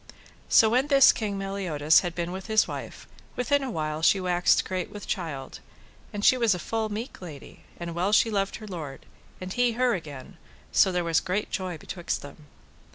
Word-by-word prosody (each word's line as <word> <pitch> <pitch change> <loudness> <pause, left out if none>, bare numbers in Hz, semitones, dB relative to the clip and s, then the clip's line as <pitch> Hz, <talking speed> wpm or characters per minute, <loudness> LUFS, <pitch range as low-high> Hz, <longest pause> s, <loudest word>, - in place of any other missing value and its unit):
So 225 - +6
when 255 +4 +2
this 275 -2 +7
King 205 -3 -3
Meliodas 185 -6 +2
had 175 -2 -4
been 170 0 -3
with 190 +2 -7
his 220 -1 +3
wife, - - -7 0.3
within 280 +3 +1
a 270 - -3
while 155 -6 -3
she 195 +4 +4
waxed 180 -1 +2
great 185 -2 -3
with 205 - -9
child, 150 -8 -5 0.5
and 205 0 -3
she 255 - +6
was 225 -5 +3
a - - -3
full 220 +4 -2
meek 220 +4 -6
lady, 155 -7 -11
and 170 -1 -5
well 180 +4 0
she 225 +1 +4
loved 195 -1 -1
her 215 - -9
lord, 160 -8 -7 0.3
and 185 0 -6
he 245 -1 +2
her 250 +1 +2
again, 145 -7 -7 0.3
so 190 - +4
there 180 -1 0
was 165 -1 +2
great 190 +3 -3
joy 185 -3 -3
betwixt 175 +3 -4
them. 145 +1 -12
185 Hz, 195 wpm, -26 LUFS, 170-220 Hz, 0.5 s, this